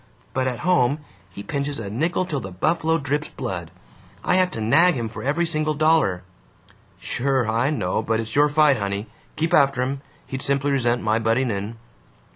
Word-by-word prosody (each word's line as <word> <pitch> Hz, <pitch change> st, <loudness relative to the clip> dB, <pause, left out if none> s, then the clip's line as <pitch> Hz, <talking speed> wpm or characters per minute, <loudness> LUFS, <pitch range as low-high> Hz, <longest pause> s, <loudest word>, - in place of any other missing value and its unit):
But 130 Hz, 0 st, 0 dB
at 125 Hz, -2 st, -3 dB
home 150 Hz, -4 st, +2 dB, 0.2 s
he 100 Hz, -, -9 dB
pinches 140 Hz, +2 st, -3 dB
a 110 Hz, -, -5 dB
nickel 160 Hz, -, 0 dB
till 150 Hz, -6 st, -2 dB
the 95 Hz, -, -7 dB
buffalo 160 Hz, -, +1 dB
drips 145 Hz, 0 st, -2 dB
blood. 90 Hz, -9 st, -5 dB, 0.5 s
I -, -, +1 dB
have 185 Hz, -1 st, +3 dB
to 115 Hz, -, -6 dB
nag 165 Hz, +11 st, +4 dB
him 115 Hz, -3 st, -2 dB
for 110 Hz, -, -8 dB
every 150 Hz, +6 st, 0 dB
single 155 Hz, -2 st, 0 dB
dollar." 155 Hz, -, +2 dB, 0.8 s
"Sure, 130 Hz, -2 st, 0 dB
I 115 Hz, +5 st, +1 dB
know, 110 Hz, -9 st, -1 dB
but 110 Hz, 0 st, 0 dB
it's 115 Hz, 0 st, -5 dB
your 145 Hz, +1 st, +5 dB
fight, 145 Hz, -2 st, +4 dB
honey. 100 Hz, 0 st, -3 dB, 0.3 s
Keep 165 Hz, +2 st, -1 dB
after 135 Hz, -2 st, +4 dB
him. 135 Hz, +1 st, -3 dB, 0.2 s
He'd 130 Hz, 0 st, -5 dB
simply 140 Hz, 0 st, +1 dB
resent 120 Hz, -3 st, +1 dB
my 110 Hz, +1 st, +2 dB
butting 115 Hz, +3 st, +1 dB
in." 100 Hz, +3 st, -4 dB
135 Hz, 185 wpm, -23 LUFS, 115-150 Hz, 0.8 s, your